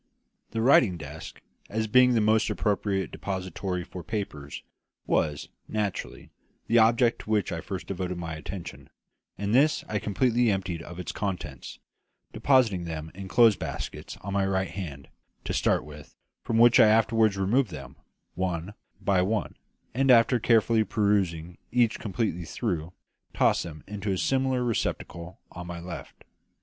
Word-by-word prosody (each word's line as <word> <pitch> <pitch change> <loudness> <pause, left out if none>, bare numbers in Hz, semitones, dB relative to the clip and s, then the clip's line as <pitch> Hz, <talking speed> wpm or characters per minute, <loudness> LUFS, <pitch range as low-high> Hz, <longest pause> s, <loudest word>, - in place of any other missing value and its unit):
The 115 0 -2
writing 115 -7 +5
desk, 75 0 -9 0.3
as 110 +1 -1
being 125 +2 +5
the 115 - +3
most 110 +1 +3
appropriate 100 0 -1
depository 95 -1 -4
for 90 +1 -9
papers, 75 -9 -5 0.4
was, 75 -1 0 0.2
naturally, 105 -3 -4 0.3
the 115 +1 +4
object 115 +2 +4
to - - -11
which 105 -4 +1
I - - -3
first - - -6
devoted 90 -1 -4
my 80 -2 -5
attention; 85 +3 -8 0.5
and 100 +2 -2
this 145 +5 +4
I 105 - -1
completely 120 +4 +1
emptied 95 -4 -2
of 85 +1 -10
its 90 - -4
contents, 90 - -5 0.6
depositing 115 -10 +3
them 80 -1 -6
in 95 +1 -8
a - - -8
clothes 115 0 +5
basket - - -6
on 100 0 -5
my 100 0 +2
right 95 0 -1
hand, 75 -8 -7 0.4
to - - -3
start - - +1
with, 75 -1 -12 0.3
from 115 - -1
which 120 0 +6
I - - +8
afterwards 110 -1 +3
removed 110 +6 +2
them, 70 -5 -9 0.4
one 90 +1 -3 0.3
by 95 -2 +2
one, 105 +4 -1 0.4
and 135 +3 +1
after 120 0 +6
carefully 115 0 +3
perusing 95 -6 0
each 120 -2 +2
completely 95 -5 -2
through, 85 -5 -3 0.4
tossed - - +3
them 80 -2 -8
into 100 0 -4
a 95 - 0
similar 130 +3 +1
receptacle 90 -6 -3
on 85 +1 -8
my 85 -1 -6
left. 85 0 -9
100 Hz, 155 wpm, -27 LUFS, 85-115 Hz, 0.6 s, I